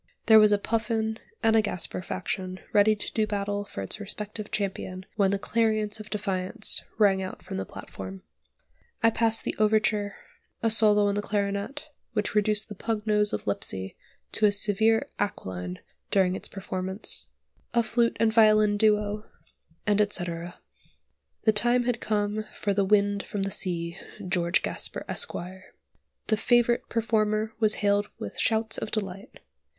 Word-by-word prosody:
There 220 -1 +8
was 215 -1 +6
a 205 - +5
Puffin 220 +1 -1 0.2
and 225 0 +4
a 220 - +6
Gasper 180 -4 -2
faction 185 - -4
ready 210 +1 +5
to 205 - -6
do 215 -1 +1
battle 205 0 -2
for 100 - -6
its 95 - -5
respective 210 +1 -4
champion 190 -2 -3
when 200 -2 +3
the 200 - +1
clarion 215 0 +1
of 215 - -9
defiance 195 -1 -1 0.2
rang 200 -3 +4
out 185 - -6
from - - -6
the 95 - -4
platform. 95 0 -9 0.8
I 230 - +6
pass 225 0 +1
the - - -1
overture, 215 -1 +2 0.5
a 225 - +3
solo 210 -2 +5
on 200 - +2
the 205 - -1
clarionet, 205 +9 -2 0.2
which 210 -2 -1
reduced 210 0 +2
the 210 - -7
pug 215 +1 -3
nose 210 -1 +2
of - - -3
Lipsey 95 -2 -2 0.4
to 215 - +4
a - - +3
severe 215 +2 +2
aquiline 90 - -3 0.3
during 185 -2 +3
its - - -4
performance; 190 0 -2 0.5
a 235 - +4
flute 235 +1 +1
and 220 -1 +3
violin 215 -2 +5
duo, 210 0 +2 0.6
and 210 0 +3
etc. 175 -4 -2 0.9
The 220 - +4
time 240 +3 +2
had 240 -1 -1
come 210 0 -1
for 200 - -1
"The 200 0 +2
Wind 205 0 +3
from 200 0 -4
the 195 - -2
Sea" 170 -3 -2 0.3
(George 175 -1 +1
Gasper - - -3
Esq.). 475 - 0
The 185 +4 -7
favourite 240 +1 +2
performer 215 -1 0
was 215 -2 +4
hailed 205 0 +2
with 100 - -7
shouts 220 0 +1
of - - -4
delight. 195 -3 -4
210 Hz, 155 wpm, -27 LUFS, 195-220 Hz, 0.9 s, There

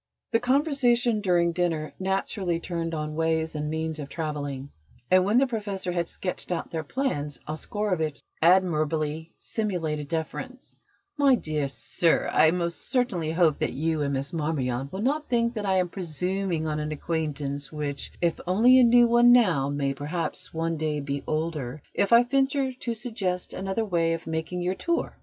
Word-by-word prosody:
The 230 - +3
conversation 245 -4 +2
during 175 -3 +3
dinner 165 -3 -1
naturally 190 -2 -1
turned 165 -1 -3
on 150 0 -3
ways 160 0 0
and 150 0 -3
means 160 0 -3
of 145 -1 -6
travelling, 145 -4 -4 0.4
and, 185 0 +6
when 205 +5 +2
the 270 - +5
Professor 205 -7 -3
had 170 -1 -1
sketched 180 0 -4
out 175 - -3
their 160 -1 -3
plans, 150 - -2
Oscarovitch 160 -1 -2
said - - -7
with - - -42
an 170 +3 +7
admirably 155 0 -1
simulated 165 -9 -2
deference: 170 - -5 0.4
"My 275 -2 +6
dear 155 - -2
sir, 165 +4 +1
I 160 - +6
most 170 0 -1
sincerely 230 - 0
hope 165 -3 +3
that - - -1
you 160 +1 0
and 140 -1 0
Miss 135 +3 -3
Marmion 140 -5 -1
will 195 +3 -4
not 295 +4 0
think 235 -1 +2
that 210 -3 -3
I 190 -1 +3
am 180 -1 +2
presuming 180 0 -2
on 150 -1 -1
an 150 0 -3
acquaintance 145 -3 -3
which, 145 -2 -4
if 170 -1 +1
only 235 +8 +6
a - - +7
new 240 0 +7
one 240 +1 +6
now, 180 - +4
may 140 -1 -1
perhaps 150 +5 -4
one 165 0 -1
day 155 -1 -1
be 140 0 -3
older, 155 -4 -3
if 200 - +1
I 235 +1 +8
venture 270 +1 +1
to 240 -2 -4
suggest 215 -6 -3
another 195 +4 -2
way 165 -4 +1
of 165 - -5
making 160 +2 -3
your 180 +1 +1
tour. 340 - -2
170 Hz, 175 wpm, -26 LUFS, 155-210 Hz, 0.4 s, I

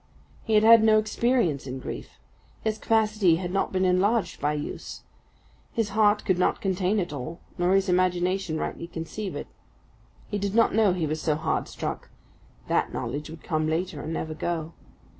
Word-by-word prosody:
He 220 - +1
had 210 - +5
had 225 0 +8
no 220 -1 +6
experience 215 - +1
in 130 +1 -4
grief; 130 - -7 0.5
his 220 -1 -1
capacity 215 -5 +3
had 175 +1 -4
not 195 +1 0
been 185 0 +1
enlarged 185 +1 +1
by 150 +1 +1
use. 150 0 -6 0.7
His 225 -4 0
heart 210 0 +3
could 185 -2 +1
not - - +2
contain 190 +1 0
it 175 -5 -3
all, 150 +5 -6 0.2
nor 180 +2 +3
his 195 0 +2
imagination 180 -1 +1
rightly 170 - -4
conceive 175 +5 -5
it. - - -4 0.8
He 205 - -3
did 200 +1 -2
not 230 - +4
know 210 -3 +4
he 175 -3 -1
was 155 +1 -2
so 155 - +1
hard 160 +1 -1
struck; - - -5 0.6
that - - +1
knowledge 145 +7 -4
would 160 0 -10
come 155 -1 0
later, 160 -1 -2
and 155 - -5
never 160 -1 -3
go. 165 0 -3
185 Hz, 180 wpm, -26 LUFS, 160-210 Hz, 0.8 s, had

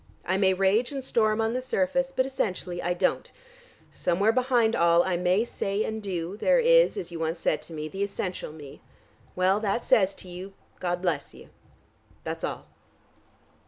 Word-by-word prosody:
I 185 - 0
may 190 -1 +3
rage 195 +7 +2
and 275 -2 -4
storm 215 -3 +1
on 225 +1 0
the 255 - -1
surface, 255 +2 0
but 260 -1 +1
essentially 185 -9 -3
I 175 +1 -1
don't. - - 0 0.6
Somewhere 195 +5 +1
behind 245 -2 +2
all 170 0 +4
I 185 - 0
may 180 +4 +2
say 200 -2 -2
and 220 0 -4
do, 185 -1 -4
there - - +3
is, - - +5
as 400 - -5
you 170 - -6
once 165 +1 -1
said - - 0
to 165 - -10
me, 155 -1 -4
the 195 +5 -6
essential 195 -4 -3
me. 145 -3 -12 0.5
Well, 185 +2 +2
that 215 +2 -1
says 195 -2 +3
to - - -10
you, 180 +2 -8 0.3
'God 175 0 -2
bless 175 -3 -2
you.' - - -14 0.7
That's - - -5
all." - - -4
195 Hz, 180 wpm, -27 LUFS, 175-230 Hz, 0.7 s, is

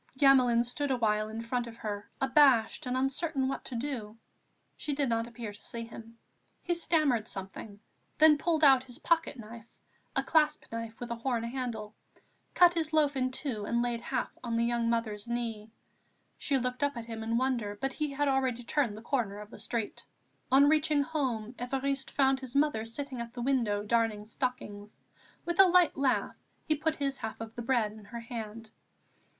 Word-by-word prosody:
Gamelin 255 -4 +5
stood 275 +4 -3
a 260 - +1
while 215 -2 +1
in 220 +1 -5
front 240 +1 -2
of 230 0 -10
her, 205 -2 -5
abashed 265 -4 +4
and 250 +1 0
uncertain 270 +1 0
what 270 - -3
to 255 - -5
do. 230 -4 -4 0.6
She 295 -2 -3
did 280 -2 0
not 230 0 0
appear 230 -3 -7
to 205 - -14
see 230 -1 -5
him. 230 0 -11 0.5
He 350 - 0
stammered 310 -9 +1
something, 195 +2 -7 0.4
then 305 -1 +6
pulled 320 -1 +1
out 265 -3 +6
his 245 -1 -9
pocket 330 -3 +1
knife, 230 0 -10 0.5
a - - +1
clasp 305 -2 +2
knife 230 -1 -6
with 240 -1 -6
a 235 - -2
horn 235 -1 -1
handle, 235 -3 -4 0.6
cut 350 -1 +7
his 320 -2 -2
loaf 295 -2 +3
in 255 -1 +1
two 255 -5 -3
and 235 +2 +1
laid 240 -1 -2
half 265 - -2
on 235 -2 -2
the 230 - +2
young 235 0 +1
mother's 225 -2 -2
knee. 230 -3 -3 0.7
She 280 - +1
looked 250 +1 -2
up 285 -3 0
at 235 - -5
him 225 -1 -6
in 225 +1 0
wonder; 235 -5 -1
but 270 0 -2
he 300 +1 -2
had 285 +1 0
already 260 -3 +1
turned 235 -4 0
the 220 - -10
corner 230 -6 -1
of 210 +1 -10
the - - -11
street. 230 -3 -3 0.5
On 275 +2 +7
reaching 305 -1 +3
home, 255 -8 -2
Évariste 270 +2 -2
found 270 -1 +2
his 260 -1 -7
mother 280 -6 +2
sitting 255 +2 -4
at 235 0 -7
the 245 - -4
window 230 -6 +1
darning 220 -1 +1
stockings. 215 -3 -5 0.5
With 345 +2 -2
a 390 - +10
light 360 -2 +5
laugh 275 -2 +1 0.3
he 310 - +4
put 310 +1 -1
his 275 -2 -2
half 220 - -6
of 225 0 -7
the 240 - -4
bread 235 -3 +1
in 215 -1 -13
her 235 +2 -7
hand. 225 -1 -7
245 Hz, 190 wpm, -30 LUFS, 225-275 Hz, 0.7 s, a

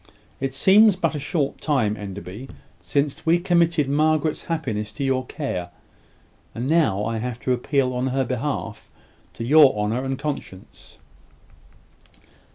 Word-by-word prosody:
It 135 0 -3
seems 200 +7 +6
but 165 -3 -1
a 150 - -3
short 145 0 -2
time, 125 -9 +1
Enderby, 100 +4 -8 0.3
since 140 0 -2
we 165 +1 +4
committed 170 -4 +2
Margaret's 155 +2 +1
happiness 115 - -3
to 125 - -4
your 130 -1 0
care; 90 - -4 0.9
and 120 +3 -3
now 145 - +2
I 115 0 -2
have 120 0 -4
to 130 - +1
appeal 130 +1 0
on 125 +1 -1
her 130 0 0
behalf 125 -3 -4 0.4
to 115 - -6
your 140 -2 +6
honour 110 +5 -1
and 135 0 -2
conscience." 140 -10 -7
135 Hz, 140 wpm, -23 LUFS, 115-155 Hz, 0.9 s, seems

